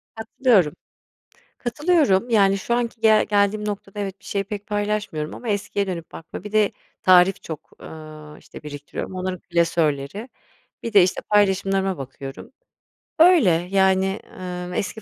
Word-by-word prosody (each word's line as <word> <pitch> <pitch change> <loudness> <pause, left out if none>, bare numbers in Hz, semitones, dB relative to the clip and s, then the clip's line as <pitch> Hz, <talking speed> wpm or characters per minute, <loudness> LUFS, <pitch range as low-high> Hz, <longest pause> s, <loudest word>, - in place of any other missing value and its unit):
Katılıyorum. 220 - +2 0.9
Katılıyorum, 245 - +1
yani, 195 -3 +4
şu 235 +5 -1
anki 235 -1 -2
gel 220 -1 +5
geldiğim 205 0 +1
noktada 205 -1 -5
evet, 195 -1 -5
bir - - -24
şeyi 200 0 -2
pek 205 0 -7
paylaşmıyorum 205 -7 -2
ama 240 - -8
eskiye 200 -1 -1
dönüp 170 -3 -6
baktığımda. 165 +4 -9
Bir 210 - -8
de 215 -1 +3 0.3
tarif 185 +1 +5
çok, 155 -2 -8
ııı, 155 -1 -11
işte, - - -13
biriktiriyorum 145 +4 -7
onların 185 0 -3
klasörleri. 170 - -1 0.5
Bir 230 - -4
de, 200 -3 +7
işte, 180 - 0
paylaşımlarıma 195 -2 +2
bakıyorum, 135 +1 -8 0.7
öyle, 330 - +6 0.2
yani, 190 +1 +2 0.2
ııı, 180 -1 -5
eski 210 +3 -3
195 Hz, 140 wpm, -22 LUFS, 180-210 Hz, 0.9 s, de